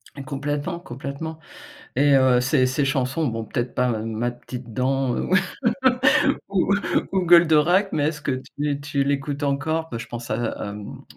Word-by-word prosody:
Et 140 - -7
complètement 145 +4 -3
complètement 140 +2 -6 0.6
et 145 0 +4
heu 130 -2 +5
ces 130 0 +3
ces 130 +3 0
chansons, 135 +3 0
bon 115 -1 -4
peut-être 120 +3 -3
pas 125 0 +2
Ma 115 +1 -2
petite 120 -1 -9
dent, 130 0 0
heu, - - -3 1.2
ou 195 0 +2 0.4
ou 190 - +2
Goldorak, 175 +3 +5
mais 145 0 +1
est-ce 155 -1 -5
que 140 -2 -1 0.3
tu 145 -1 -1
tu 145 -1 0
l'écoutes 140 +1 -2
encore? 155 +3 -1
Bah 115 - -4
je 115 - -7
pense 120 0 -7
à - - +1 0.2
à, 100 - -5
mmh 105 -1 -9
140 Hz, 165 wpm, -23 LUFS, 125-150 Hz, 1.2 s, heu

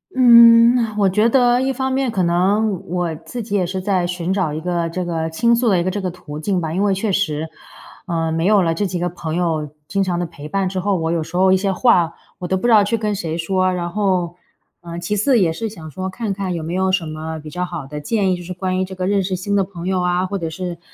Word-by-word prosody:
嗯， 235 -1 +8 0.2
我 200 -2 +3
觉 210 +5 +3
得 245 0 +3
一 265 0 0
方 265 0 -2
面 265 -2 0
可 195 -5 0
能， 190 +3 +1
我 175 -1 -2
自 235 +9 -7
己 205 - -7
也 195 -3 +2
是 185 +2 -3
在 185 -2 0
寻 180 +1 -2
找 185 -6 0
一 155 - -4
个 170 0 -2
这 180 +1 -3
个 165 -1 -2
倾 235 +8 +2
诉 235 -1 +1
的 190 - +3
一 - - 0
个 185 - -1
这 205 +1 -3
个 185 - -2
途 155 -4 -9
径 185 +3 0
吧。 160 -1 -3
因 190 - 0
为 200 -2 +2
确 200 +1 -1
实， 160 -5 -1 0.6
呃， 165 -2 -1
没 165 +1 -1
有 205 -3 +4
了 165 -1 +1
这 200 +4 -1
几 180 - -3
个 175 +1 -1
朋 165 -2 -5
友 160 -4 -1 0.2
经 195 0 0
常 180 -2 -1
的 175 - -1
陪 150 -3 -10
伴 195 -1 0
之 185 0 -3
后， 200 +1 0
我 165 0 -1
有 170 -1 0
时 165 +3 -5
候 190 0 +4
一 190 - +5
些 195 0 0
话， 180 -5 +3 0.3
我 180 - -4
都 190 +1 0
不 215 - -4
知 - - +3
道 210 -2 +7
去 230 +3 0
跟 210 -1 -1
谁 165 -4 -3
说。 185 +2 +1
然 175 -1 -2
后， 180 -3 -1 0.5
呃， 170 0 -8
其 175 +4 -2
次 240 +3 +3
也 165 -4 +2
是 220 +6 -4
想 160 -7 -10
说， 190 +3 -4
看 210 0 -3
看 190 -2 -3
有 160 - -4
没 165 +2 -4
有 190 0 +1
什 185 -3 0
么 155 +1 -5
比 155 - -9
较 180 0 -3
好 170 -6 -5
的 150 +2 -7
建 195 +2 0
议， - - -2
就 - - -9
是 180 - -8
关 185 0 -2
于 - - +1
这 190 0 -7
个 185 0 -3
认 200 0 +1
识 185 0 -2
新 200 +3 -2
的 195 - +3
朋 180 -2 -8
友 185 -1 0
啊， 180 +1 +1
或 195 +1 -3
者 165 -1 -3
是 175 0 -6
185 Hz, 300 characters per minute, -19 LUFS, 170-200 Hz, 0.6 s, 嗯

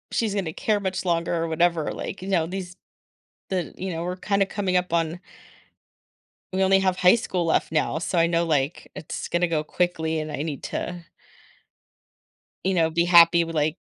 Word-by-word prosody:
She's 215 -3 0
gonna 180 -6 -2
care 210 +4 0
much 190 -1 -3
longer 170 -1 0
or 165 -1 0
whatever, 165 -1 +1
like, 185 - -6
you 190 - -7
know, 180 -5 +2
these 180 +1 -6 0.7
the 185 -3 -2
you 190 +1 -4
know, 165 0 -4
we're 180 +1 -3
kinda 200 +1 +1
coming 195 -2 -1
up 180 -1 0
on 165 0 0 1.3
we 190 - 0
only 195 0 +4
have 185 -1 +1
high 180 +3 +6
school 185 -6 -2
left 160 - +1
now, 155 0 0
so 175 +1 -2
I 165 0 +4
know, 170 0 +1
like, 150 -1 -1
it's - - -6
gonna 175 +1 +1
go 160 -2 -1
quickly 160 -1 -1
and 155 0 -4
I 140 - -4
need 150 -3 -5
to 175 -1 -5 1.6
you 190 - +1
know, 165 -3 +2
be 170 +1 +1
happy 170 -1 +7
with, 165 0 -6
like, 155 +1 0
170 Hz, 190 wpm, -24 LUFS, 165-185 Hz, 1.6 s, happy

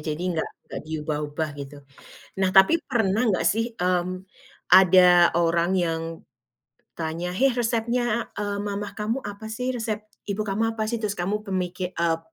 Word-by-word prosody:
Jadi 155 +3 -3
nggak 160 - -2 0.2
nggak - - -7
diubah-ubah 150 0 -3
gitu. 140 +1 -8 0.6
Nah, 190 -1 +2
tapi 195 +11 +6
pernah 225 -2 +1
nggak 190 - 0
sih, 225 +2 -2
mmm, 185 +1 -1 0.4
ada 180 -1 +7
orang 170 +1 +2
yang 165 -3 0 0.9
tanya, 170 +2 -4
"hei 270 +6 +3
resepnya, 235 0 -1
eee, 205 -1 -2
mama 205 0 -4
kamu 220 +5 -2
apa 205 +1 -8
sih? 250 +3 -2
Resep 225 -2 -2 0.2
ibu 205 +1 -3
kamu 220 +3 0
apa 220 -1 -3
sih?" 235 - -1
Terus 205 -2 -2
kamu 185 +4 0
kemiki 185 -2 -3
eee, 165 -1 +2
190 Hz, 150 wpm, -25 LUFS, 175-220 Hz, 0.9 s, ada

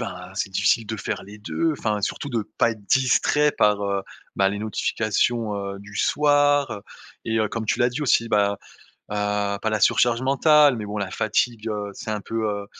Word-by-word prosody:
enfin, 90 -5 -7
c'est 100 -1 -2
difficile 105 +4 +1
de 110 +1 -4
faire 100 - -4
les 100 +2 -12
2, 160 +9 -1
enfin, 105 -2 -1
surtout 140 +7 -3
de 115 -2 -1 0.2
pas 115 - +4
être 110 -2 -8
distrait 135 +5 +3
par, 105 -1 +2
heu, 100 -1 -1 0.3
bah, 95 0 +3
les 100 +1 -3
notifications, 110 +1 -1
heu, 100 0 -5
du 100 0 -13
soir, 145 -2 +3
heu 105 - -5 0.5
et 110 0 0
heu, 110 -1 +1
comme 110 +1 -4
tu - - 0
l'as 120 - +3
dit 125 - -5
aussi, 115 -4 +2
ben, 100 -1 +2 0.6
heu, 105 -1 -1
pas 110 - -1
la 110 -1 -1
surcharge 120 0 +3
mentale 145 +1 +4
mais 105 -2 -5
bon 105 +1 -5
la 100 -2 -3
fatigue, 110 +1 -1
heu, 105 -1 -3
s'est 110 - -7
un 105 -1 -2
peu, 115 +2 -3
heu 100 -1 -4
110 Hz, 205 wpm, -23 LUFS, 100-120 Hz, 0.6 s, pas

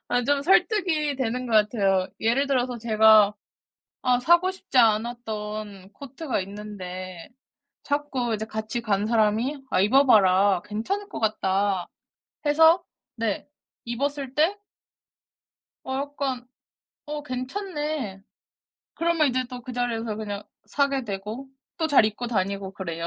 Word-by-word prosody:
아 245 -1 +1
좀 285 +1 +1
설득이 340 -4 +2
되는 250 0 -2
것 235 - -5
같아요. 200 -3 +2
예를 240 +6 +2
들어서 250 -2 0
제가 215 -2 +5 0.7
아 250 -3 +2
사고 345 +7 +4
싶지 375 -7 -4
않았던 215 -3 -1
코트가 280 0 -4
있는데 185 -3 -8 0.5
자꾸 280 -5 -1
이제 215 +1 -4
같이 220 +2 -4
간 205 -3 0
사람이 230 +5 +1
"아 185 - +3
입어봐라 200 -6 +5
괜찮을 390 - -3
것 - - -6
같다." 200 -3 0 0.6
해서 320 +4 +5 0.3
네. 225 -4 -2 0.4
입었을 270 +2 -3
때 320 +7 +3 1.3
어 265 - -4
약간 275 -3 -3 0.6
"어 295 0 -4
괜찮네." 295 - -4 0.7
그러면 330 -2 +2
이제 255 0 0
또 250 -1 -8
그 250 - -7
자리에서 230 -3 -2
그냥 205 -1 -5 0.2
사게 280 -2 0
되고 210 +6 -6 0.3
또 320 - +1
잘 285 -7 +5
입고 215 +3 -2
다니고 195 -3 -2
그래요. 170 -3 -5
240 Hz, 245 characters per minute, -25 LUFS, 210-280 Hz, 1.3 s, 제가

